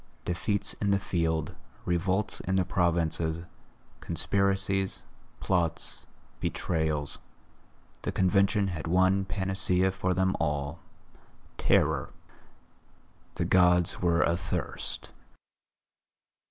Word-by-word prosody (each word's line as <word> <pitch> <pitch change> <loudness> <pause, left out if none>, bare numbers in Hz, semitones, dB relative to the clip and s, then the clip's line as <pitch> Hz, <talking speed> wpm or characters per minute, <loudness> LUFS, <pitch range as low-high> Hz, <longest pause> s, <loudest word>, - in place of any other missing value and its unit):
Defeats 100 +4 -1
in 100 - +1
the 100 - +4
field, 80 -5 -1 0.3
revolts 95 +3 0
in 95 - -1
the 95 -1 +2
provinces, 85 -2 +1 0.6
conspiracies, 95 -1 0 0.4
plots, 85 -4 -1 0.3
betrayals, 80 -4 -1 0.8
the - - -2
Convention 100 +1 +3
had 80 -3 -4
one 95 +3 +3
panacea 95 -1 0
for 95 -1 -1
them 95 +1 +2
all, 75 0 -1 0.8
terror. 75 -3 +2 1.3
The - - -1
Gods 90 -1 +3
were 85 -1 +3
athirst. 85 +1 -3
90 Hz, 85 wpm, -29 LUFS, 85-95 Hz, 1.3 s, the